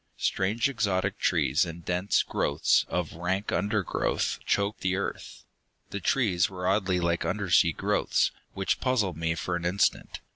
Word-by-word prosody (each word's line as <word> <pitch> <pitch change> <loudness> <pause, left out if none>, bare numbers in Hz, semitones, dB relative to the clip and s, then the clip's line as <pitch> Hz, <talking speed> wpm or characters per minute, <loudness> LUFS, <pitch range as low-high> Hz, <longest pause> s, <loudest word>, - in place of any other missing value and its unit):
Strange 105 +6 +1
exotic 105 -8 -1
trees 70 +4 +2
and 85 -1 -7
dense 90 +3 +1
growths 70 - +1
of 90 -3 -2
rank 95 +5 -2
undergrowth 105 -1 -1
choked 100 +1 0
the 95 0 0
earth. 100 - -5 0.5
The 100 - -3
trees 95 -4 +2
were 90 -1 -6
oddly 95 -3 +1
like 85 -1 0
undersea 90 -4 +2
growths, - - +1 0.2
which 95 0 -1
puzzled 110 - 0
me 80 0 -1
for 85 +2 -2
an 85 - -4
instant. 90 +3 0
95 Hz, 145 wpm, -27 LUFS, 85-100 Hz, 0.5 s, trees